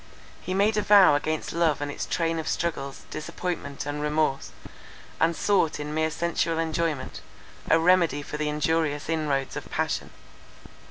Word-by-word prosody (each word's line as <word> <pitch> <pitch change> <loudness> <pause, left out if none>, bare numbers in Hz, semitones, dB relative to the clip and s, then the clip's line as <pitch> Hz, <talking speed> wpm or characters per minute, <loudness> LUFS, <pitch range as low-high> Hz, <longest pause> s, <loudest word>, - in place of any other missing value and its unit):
He 185 - -3
made 210 +2 +2
a - - +3
vow 200 -4 +7
against 155 +2 -1
love 165 -3 +2
and 145 0 -3
its - - -5
train 165 -1 0
of 160 - -5
struggles, 145 -5 -3
disappointment 155 -2 -4
and 145 0 -3
remorse, 150 -2 0 0.7
and 165 +1 +2
sought 170 -5 +1
in 150 0 -4
mere 160 0 +1
sensual 165 0 -1
enjoyment, 160 -3 -2 0.5
a - - +6
remedy 165 -4 +3
for 150 - -6
the 150 0 -1
injurious 150 0 0
inroads 145 -4 -1
of - - -6
passion. - - -2
160 Hz, 155 wpm, -26 LUFS, 150-170 Hz, 0.7 s, vow